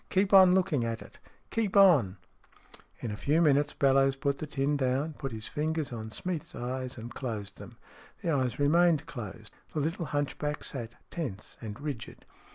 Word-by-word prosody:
" -, -, -38 dB
Keep 195 Hz, +1 st, +2 dB
on 190 Hz, -2 st, +9 dB
looking 175 Hz, -9 st, +2 dB
at 115 Hz, -1 st, -3 dB
it. -, -, -16 dB, 0.3 s
Keep 215 Hz, -3 st, 0 dB
on! 145 Hz, -, +6 dB, 0.4 s
" -, -, -23 dB
In 115 Hz, -, -3 dB
a -, -, -3 dB
few 145 Hz, +9 st, +1 dB
minutes 145 Hz, -2 st, +3 dB
Bellowes 135 Hz, 0 st, +4 dB
put 140 Hz, 0 st, -1 dB
the 155 Hz, -, -4 dB
tin 140 Hz, 0 st, 0 dB
down, 135 Hz, +3 st, 0 dB
put 135 Hz, -2 st, -5 dB
his 110 Hz, -1 st, -6 dB
ringers 155 Hz, -2 st, -1 dB
on 110 Hz, -1 st, -5 dB
Smeath's 170 Hz, +6 st, -4 dB
eyes, 130 Hz, +1 st, -4 dB
and 115 Hz, +1 st, -8 dB
closed 105 Hz, -6 st, -5 dB
them. -, -, -11 dB, 0.5 s
The 170 Hz, -, +1 dB
eyes 130 Hz, -4 st, 0 dB
remained 160 Hz, +2 st, +4 dB
closed. 110 Hz, -2 st, -8 dB, 0.2 s
The -, -, +1 dB
little 165 Hz, +4 st, -1 dB
hunchback 150 Hz, 0 st, -2 dB
sat 120 Hz, -3 st, -5 dB, 0.2 s
tense 120 Hz, -, -5 dB
and 105 Hz, 0 st, -7 dB
rigid. 145 Hz, -6 st, -6 dB
140 Hz, 180 wpm, -30 LUFS, 120-155 Hz, 0.5 s, on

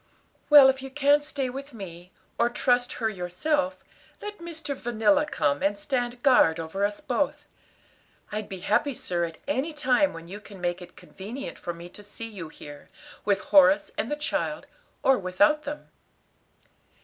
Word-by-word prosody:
"Well, 290 Hz, -3 st, +10 dB
if 265 Hz, 0 st, +2 dB
you 270 Hz, -, -7 dB
can't 290 Hz, +1 st, +3 dB
stay 280 Hz, -2 st, -2 dB
with 275 Hz, +1 st, -7 dB
me, 180 Hz, -3 st, -9 dB, 0.3 s
or 235 Hz, +1 st, +4 dB
trust 245 Hz, 0 st, +1 dB
her 225 Hz, -, -1 dB
yourself, 270 Hz, -, -1 dB, 0.4 s
let 415 Hz, -1 st, -7 dB
Mr. 320 Hz, -4 st, -5 dB
Vanilla 240 Hz, +5 st, +2 dB
come 145 Hz, -, 0 dB
and 200 Hz, +1 st, +1 dB
stand 245 Hz, +1 st, -2 dB
guard 245 Hz, -, +5 dB
over 165 Hz, +5 st, -3 dB
us 205 Hz, 0 st, 0 dB
both. -, -, -1 dB, 0.9 s
I'd 210 Hz, 0 st, -4 dB
be 190 Hz, -2 st, -7 dB
happy, 240 Hz, +8 st, +1 dB
sir, 175 Hz, -4 st, -1 dB
at 165 Hz, -1 st, -8 dB
any 290 Hz, +3 st, -1 dB
time 290 Hz, -1 st, +2 dB
when 165 Hz, 0 st, -10 dB
you 200 Hz, +4 st, -8 dB
can 205 Hz, -2 st, -12 dB
make 175 Hz, 0 st, -2 dB
it 180 Hz, -, -12 dB
convenient 230 Hz, +9 st, -8 dB
for 175 Hz, -, -4 dB
me 170 Hz, 0 st, -9 dB
to 205 Hz, -, -13 dB
see 205 Hz, +2 st, -8 dB
you 190 Hz, -8 st, -8 dB
here, 145 Hz, -2 st, -12 dB, 0.4 s
with 200 Hz, -1 st, +2 dB
Horace 195 Hz, -1 st, +5 dB
and 225 Hz, -, -2 dB
the 295 Hz, -, 0 dB
child, 295 Hz, 0 st, -2 dB, 0.4 s
or 270 Hz, -1 st, +4 dB
without 200 Hz, +11 st, +2 dB
them." 295 Hz, +1 st, -6 dB
230 Hz, 170 wpm, -26 LUFS, 185-280 Hz, 0.9 s, Well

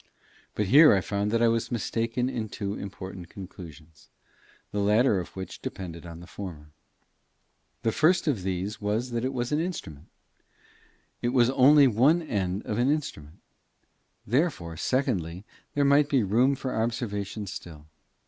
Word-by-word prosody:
But 105 Hz, -, 0 dB
here 145 Hz, -, +7 dB
I -, -, +3 dB
found 100 Hz, +2 st, -2 dB
that 115 Hz, +2 st, +1 dB
I -, -, +6 dB
was 115 Hz, +1 st, 0 dB
mistaken 115 Hz, +2 st, -1 dB
in 120 Hz, -4 st, -3 dB
two 100 Hz, -1 st, -4 dB
important 95 Hz, -3 st, -8 dB
conclusions, 85 Hz, -5 st, -12 dB, 0.6 s
the 105 Hz, -, -2 dB
latter 105 Hz, +1 st, +3 dB
of 90 Hz, -, -8 dB
which 95 Hz, -1 st, -7 dB
depended 85 Hz, -2 st, -7 dB
on 85 Hz, 0 st, -9 dB
the -, -, -10 dB
former. 80 Hz, -6 st, -9 dB, 1.1 s
The 115 Hz, -, +2 dB
first 165 Hz, +7 st, +3 dB
of 130 Hz, -10 st, +1 dB
these 95 Hz, +3 st, -3 dB
was 110 Hz, +5 st, -1 dB
that 120 Hz, 0 st, -2 dB
it 130 Hz, -, 0 dB
was 120 Hz, -1 st, -3 dB
an 150 Hz, -, +2 dB
instrument: 160 Hz, -, -5 dB, 1.1 s
it 120 Hz, -, +1 dB
was 125 Hz, -1 st, +3 dB
only 140 Hz, +2 st, +6 dB
one 135 Hz, +8 st, +4 dB
end 100 Hz, -, -2 dB
of 105 Hz, +1 st, -2 dB
an 125 Hz, +3 st, +3 dB
instrument; 85 Hz, -, -4 dB, 0.8 s
therefore, 120 Hz, -, 0 dB
secondly, 95 Hz, -, -1 dB, 0.3 s
there 145 Hz, -1 st, +3 dB
might 140 Hz, +1 st, +4 dB
be 135 Hz, -6 st, +3 dB
room 120 Hz, +8 st, +3 dB
for 130 Hz, -1 st, -4 dB
observation 110 Hz, -3 st, -2 dB
still. 80 Hz, -5 st, -9 dB
110 Hz, 155 wpm, -27 LUFS, 95-130 Hz, 1.1 s, here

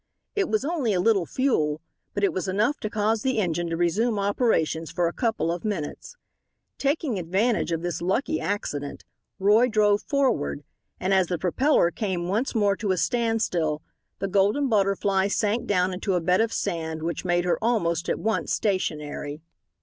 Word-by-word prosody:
It 400 Hz, -3 st, +1 dB
was 215 Hz, +4 st, 0 dB
only 290 Hz, -9 st, 0 dB
a 180 Hz, -, +1 dB
little 195 Hz, -3 st, +2 dB
fuel, 155 Hz, -, +1 dB, 0.4 s
but 205 Hz, -, -1 dB
it 200 Hz, -, +3 dB
was 185 Hz, +1 st, -2 dB
enough 215 Hz, +9 st, +1 dB
to 215 Hz, -, -3 dB
cause 215 Hz, +1 st, 0 dB
the 260 Hz, 0 st, 0 dB
engine 175 Hz, -4 st, 0 dB
to 165 Hz, -, -2 dB
resume 210 Hz, +7 st, +1 dB
operations 200 Hz, -6 st, +1 dB
for 175 Hz, -1 st, 0 dB
a 170 Hz, -, -3 dB
couple 225 Hz, -8 st, 0 dB
of 175 Hz, -, -4 dB
minutes. 205 Hz, -, -4 dB, 0.6 s
Taking 280 Hz, -, 0 dB
advantage 190 Hz, +4 st, 0 dB
of 165 Hz, 0 st, -2 dB
this 175 Hz, -1 st, -3 dB
lucky 265 Hz, -, 0 dB
accident, 145 Hz, -8 st, -3 dB, 0.3 s
Roy 210 Hz, +5 st, +4 dB
drove 210 Hz, -3 st, +3 dB
forward, 260 Hz, -, 0 dB, 0.4 s
and 190 Hz, +1 st, 0 dB
as 190 Hz, -2 st, +3 dB
the 175 Hz, -, -1 dB
propeller 185 Hz, -, +2 dB
came 185 Hz, -5 st, -2 dB
once 225 Hz, +8 st, -1 dB
more 205 Hz, -2 st, +3 dB
to 210 Hz, -, -3 dB
a 185 Hz, -, +2 dB
standstill 215 Hz, -10 st, 0 dB, 0.3 s
the 195 Hz, -, -2 dB
Golden 200 Hz, +9 st, +2 dB
Butterfly 195 Hz, -2 st, +2 dB
sank 210 Hz, +3 st, 0 dB
down 185 Hz, -2 st, +1 dB
into 190 Hz, +1 st, -1 dB
a -, -, +2 dB
bed 180 Hz, +4 st, +2 dB
of 225 Hz, 0 st, +1 dB
sand 160 Hz, -6 st, -3 dB
which 165 Hz, -1 st, -3 dB
made 175 Hz, -1 st, +1 dB
her 180 Hz, -, 0 dB
almost 170 Hz, -8 st, +1 dB
at -, -, +1 dB
once 220 Hz, +1 st, -1 dB
stationary. 150 Hz, -7 st, -2 dB
195 Hz, 175 wpm, -25 LUFS, 175-225 Hz, 0.6 s, Roy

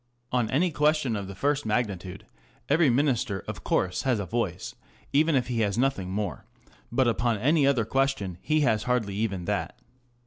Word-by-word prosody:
On 125 Hz, -3 st, +1 dB
any 165 Hz, +7 st, +2 dB
question 150 Hz, -5 st, +1 dB
of 100 Hz, -2 st, -4 dB
the 100 Hz, -, -8 dB
first 145 Hz, +5 st, 0 dB
magnitude 100 Hz, -5 st, -2 dB, 0.4 s
every 155 Hz, 0 st, +4 dB
Minister 120 Hz, -7 st, +1 dB
of -, -, -6 dB
course 90 Hz, -1 st, 0 dB
has 125 Hz, -5 st, +1 dB
a 100 Hz, -, -3 dB
voice, 95 Hz, -3 st, -3 dB, 0.4 s
even 155 Hz, +2 st, +3 dB
if 130 Hz, -2 st, +2 dB
he 125 Hz, -2 st, -2 dB
has 105 Hz, -2 st, 0 dB
nothing 120 Hz, -8 st, 0 dB
more; 95 Hz, -7 st, -3 dB, 0.5 s
but 130 Hz, +1 st, +2 dB
upon 115 Hz, -1 st, +1 dB
any 140 Hz, +6 st, +3 dB
other 125 Hz, -6 st, +2 dB
question 115 Hz, -8 st, -1 dB
he 155 Hz, 0 st, +1 dB
has 110 Hz, -5 st, +1 dB
hardly 120 Hz, -6 st, 0 dB
even 100 Hz, -4 st, -2 dB
that. -, -, -2 dB
120 Hz, 175 wpm, -27 LUFS, 100-135 Hz, 0.5 s, every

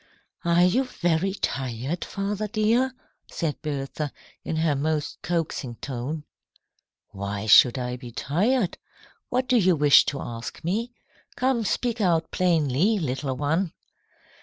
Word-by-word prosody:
"Are 170 Hz, +1 st, +4 dB
you 235 Hz, +9 st, +3 dB
very 180 Hz, -4 st, 0 dB
tired, 130 Hz, -, -3 dB
father 205 Hz, +1 st, -3 dB
dear?" 230 Hz, +5 st, +1 dB, 0.4 s
said 160 Hz, -3 st, -3 dB
Bertha, 145 Hz, 0 st, -3 dB, 0.3 s
in -, -, -3 dB
her 160 Hz, -2 st, +2 dB
most 150 Hz, +1 st, -2 dB
coaxing 160 Hz, -7 st, -2 dB
tone. 140 Hz, +5 st, -5 dB, 0.9 s
"Why 100 Hz, +1 st, -4 dB
should 120 Hz, +3 st, +7 dB
I 125 Hz, 0 st, -3 dB
be 125 Hz, -2 st, -10 dB
tired? 190 Hz, -, 0 dB, 0.5 s
What 255 Hz, +1 st, 0 dB
do 250 Hz, -, +4 dB
you 185 Hz, -5 st, +4 dB
wish 145 Hz, -2 st, +7 dB
to 140 Hz, -, -2 dB
ask 115 Hz, +3 st, -7 dB
me? 220 Hz, +9 st, -1 dB, 0.4 s
Come, 255 Hz, -2 st, +1 dB
speak 235 Hz, +2 st, -1 dB
out 170 Hz, -4 st, +1 dB
plainly, 170 Hz, -, +2 dB
little 135 Hz, -5 st, -2 dB
one." 160 Hz, +5 st, 0 dB
160 Hz, 130 wpm, -25 LUFS, 135-200 Hz, 0.9 s, should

